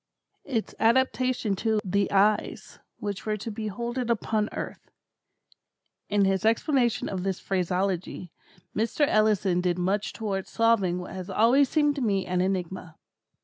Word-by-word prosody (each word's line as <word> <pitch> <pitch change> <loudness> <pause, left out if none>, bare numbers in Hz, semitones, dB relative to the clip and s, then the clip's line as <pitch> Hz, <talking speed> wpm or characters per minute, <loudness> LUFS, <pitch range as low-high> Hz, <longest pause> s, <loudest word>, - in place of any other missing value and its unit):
"Its 235 -6 -2
adaptation 255 -2 +2
to 220 +2 0
the 200 +1 +1
eyes 205 +2 +1 0.2
which 205 -1 -4
were 215 0 0
to 220 +2 -6
behold 225 +4 -4
it 245 -2 -2
upon 220 -2 0
earth." - - -7 1.2
In 205 -1 +3
his 190 +1 +1
explanation 235 +2 +2
of 190 -2 -3
this 190 0 -2
phraseology, 185 -1 -2 0.4
Mr. 230 +7 +1
Ellison 210 -5 +2
did 180 -1 0
much 195 +3 0
towards 200 -4 -4
solving 225 -6 +2
what 180 0 -7
has 185 -1 -6
always 255 +5 +4
seemed 295 -2 +2
to - - -2
me 200 -5 +1
an 180 0 0
enigma. 185 -3 -3
205 Hz, 145 wpm, -27 LUFS, 190-230 Hz, 1.2 s, always